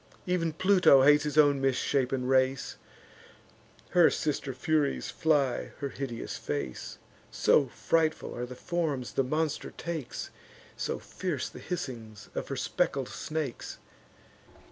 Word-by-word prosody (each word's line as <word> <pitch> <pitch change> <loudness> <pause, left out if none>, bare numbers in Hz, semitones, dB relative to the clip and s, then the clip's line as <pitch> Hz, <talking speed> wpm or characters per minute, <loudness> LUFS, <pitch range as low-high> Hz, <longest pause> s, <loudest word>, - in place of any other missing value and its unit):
Ev'n 170 -3 0
Pluto 180 -6 +5
hates 150 +1 +6
his 150 0 -3
own 145 -2 +5
misshapen 135 -1 +1
race; 130 0 +1 1.1
Her 175 -2 +6
sister 145 -2 -2
Furies 145 +2 0
fly 145 -5 +1
her 140 - -3
hideous 130 -4 -5
face; 70 -4 -4 0.3
So 140 - +3
frightful 160 +5 0
are 125 +1 -4
the 125 - -8
forms 150 -6 -2
the 135 - +2
monster 155 +3 -1
takes, 165 -6 -5 0.4
So - - -2
fierce - - -4
the - - -11
hissings 120 - -6
of - - -4
her 135 - -3
speckled 135 0 -1
snakes. 155 -6 -4
140 Hz, 120 wpm, -29 LUFS, 130-155 Hz, 1.1 s, hates